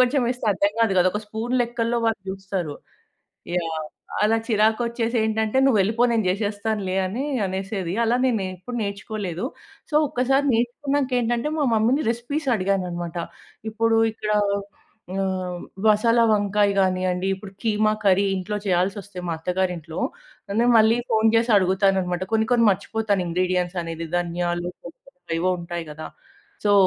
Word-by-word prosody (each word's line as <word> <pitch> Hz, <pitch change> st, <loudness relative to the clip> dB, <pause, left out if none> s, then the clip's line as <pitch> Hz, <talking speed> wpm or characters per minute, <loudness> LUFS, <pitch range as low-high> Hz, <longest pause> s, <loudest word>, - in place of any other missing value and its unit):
కొంచెం 255 Hz, +2 st, +4 dB
వేస్తే 245 Hz, -1 st, -3 dB
అర్థం 200 Hz, +2 st, +1 dB
కాదు 225 Hz, -4 st, +3 dB
కదా! 180 Hz, -, +5 dB
ఒక 210 Hz, -, -2 dB
స్పూన్ 225 Hz, +4 st, -3 dB
లెక్కల్లో 235 Hz, 0 st, -1 dB
వాళ్ళు 225 Hz, -3 st, 0 dB
చూస్తారు. 190 Hz, -5 st, -4 dB, 0.8 s
యాహ్! 165 Hz, -2 st, -1 dB, 0.5 s
అలా 225 Hz, +1 st, +3 dB
చిరాకు 220 Hz, +1 st, +3 dB
వచ్చేసి 235 Hz, 0 st, -2 dB
ఏంటంటే 220 Hz, +2 st, 0 dB
నువ్వు 250 Hz, -6 st, +4 dB
వెళ్ళిపో, 225 Hz, +5 st, 0 dB
నేను 220 Hz, -3 st, +1 dB
చేసేస్తానులే 205 Hz, -1 st, -2 dB
అని 235 Hz, +9 st, -3 dB, 0.2 s
అనేసేది. 190 Hz, -1 st, -3 dB
అలా 240 Hz, +2 st, +3 dB
నేను 225 Hz, -6 st, +1 dB
ఎప్పుడు 240 Hz, +7 st, -7 dB
నేర్చుకోలేదు. 200 Hz, -1 st, -4 dB, 0.5 s
సో -, -, +3 dB
ఒక్కసారి 270 Hz, +1 st, +1 dB
నేర్చుకున్నాక 265 Hz, +3 st, 0 dB
ఏంటంటే 240 Hz, +4 st, 0 dB
మా 290 Hz, -, +2 dB
మమ్మీ‌ని 235 Hz, +7 st, +2 dB
రెసిపీస్ 265 Hz, +5 st, -3 dB
అడిగానన్నమాట. 180 Hz, -3 st, -2 dB, 0.5 s
ఇప్పుడు 225 Hz, +1 st, +2 dB
ఇక్కడ 215 Hz, -1 st, -3 dB, 0.8 s
హ్మ్, 185 Hz, -2 st, -2 dB, 0.2 s
మసాలా 230 Hz, +2 st, +4 dB
వంకాయ 205 Hz, -1 st, +2 dB
కానియండి. 185 Hz, -1 st, +1 dB
ఇప్పుడు 195 Hz, 0 st, -11 dB
కీమా 215 Hz, -1 st, +2 dB
కర్రీ 195 Hz, 0 st, +4 dB
ఇంట్లో 195 Hz, +3 st, -3 dB
చేయాల్సి 185 Hz, +1 st, +1 dB
వస్తే 200 Hz, -1 st, -12 dB
మా 170 Hz, -, 0 dB
అత్తగారింట్లో, 180 Hz, -2 st, -2 dB, 0.6 s
నేను 240 Hz, -, +4 dB
మళ్ళీ 220 Hz, +1 st, +5 dB
ఫోన్ 220 Hz, 0 st, +4 dB
చేసి 230 Hz, +1 st, +3 dB
అడుగుతానన్నమాట. 190 Hz, -1 st, +2 dB
కొన్ని 220 Hz, 0 st, +2 dB
కొన్ని 240 Hz, -2 st, +4 dB
మర్చిపోతాను 205 Hz, 0 st, -1 dB
ఇంగ్రీడియెంట్స్ 180 Hz, +1 st, 0 dB
అనేది 165 Hz, 0 st, -5 dB
ధనియాలు 175 Hz, 0 st, -1 dB, 0.2 s
కొన్ని 170 Hz, -, -10 dB, 0.2 s
కొన్ని 175 Hz, -2 st, -10 dB
ఏవో 185 Hz, +2 st, +1 dB
ఉంటాయి 170 Hz, 0 st, -5 dB
కదా! 155 Hz, +1 st, -7 dB, 0.6 s
సో 205 Hz, -, +4 dB
205 Hz, 145 wpm, -23 LUFS, 185-230 Hz, 0.8 s, కదా